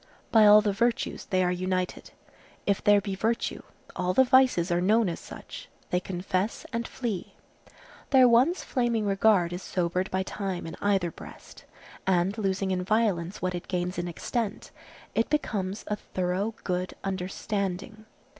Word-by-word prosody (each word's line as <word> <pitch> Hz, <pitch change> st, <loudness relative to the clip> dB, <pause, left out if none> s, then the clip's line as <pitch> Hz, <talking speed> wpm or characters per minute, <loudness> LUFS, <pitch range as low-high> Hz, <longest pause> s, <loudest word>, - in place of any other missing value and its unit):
By 220 Hz, -2 st, +7 dB
all 210 Hz, +1 st, +9 dB
the 210 Hz, -1 st, 0 dB
virtues 235 Hz, +4 st, 0 dB
they 185 Hz, -2 st, +1 dB
are 180 Hz, -, +1 dB
united. 185 Hz, 0 st, -2 dB, 0.6 s
If 200 Hz, -1 st, 0 dB
there 205 Hz, 0 st, +6 dB
be 195 Hz, 0 st, -4 dB
virtue, 225 Hz, +4 st, -1 dB, 0.3 s
all 180 Hz, 0 st, -1 dB
the 260 Hz, -, +7 dB
vices 255 Hz, -9 st, +4 dB
are 175 Hz, 0 st, +2 dB
known 215 Hz, +3 st, +3 dB
as 170 Hz, -, -3 dB
such; -, -, -10 dB, 0.2 s
they 180 Hz, -, +2 dB
confess 185 Hz, +3 st, -2 dB
and 235 Hz, +1 st, -2 dB
flee. 220 Hz, -8 st, -4 dB, 0.7 s
Their 260 Hz, -2 st, +7 dB
once 255 Hz, +10 st, +4 dB
flaming 235 Hz, -4 st, 0 dB
regard 195 Hz, -3 st, +3 dB
is 180 Hz, -, -5 dB
sobered 180 Hz, 0 st, -1 dB
by 190 Hz, 0 st, 0 dB
time 190 Hz, -2 st, -4 dB
in 165 Hz, -, -6 dB
either 195 Hz, -4 st, +1 dB
breast, -, -, -13 dB, 0.4 s
and 185 Hz, +1 st, +2 dB
losing 195 Hz, -1 st, 0 dB
in 180 Hz, -1 st, 0 dB
violence 195 Hz, -4 st, 0 dB
what 185 Hz, 0 st, 0 dB
it 175 Hz, 0 st, -6 dB
gains 180 Hz, -1 st, -2 dB
in 175 Hz, -, -2 dB
extent, 215 Hz, +6 st, -3 dB, 0.4 s
it 225 Hz, -, +1 dB
becomes 205 Hz, -9 st, -1 dB
a 210 Hz, -, -1 dB
thorough 190 Hz, +3 st, -2 dB
good 180 Hz, 0 st, -2 dB
understanding. 195 Hz, +2 st, -3 dB
195 Hz, 155 wpm, -27 LUFS, 180-220 Hz, 0.7 s, all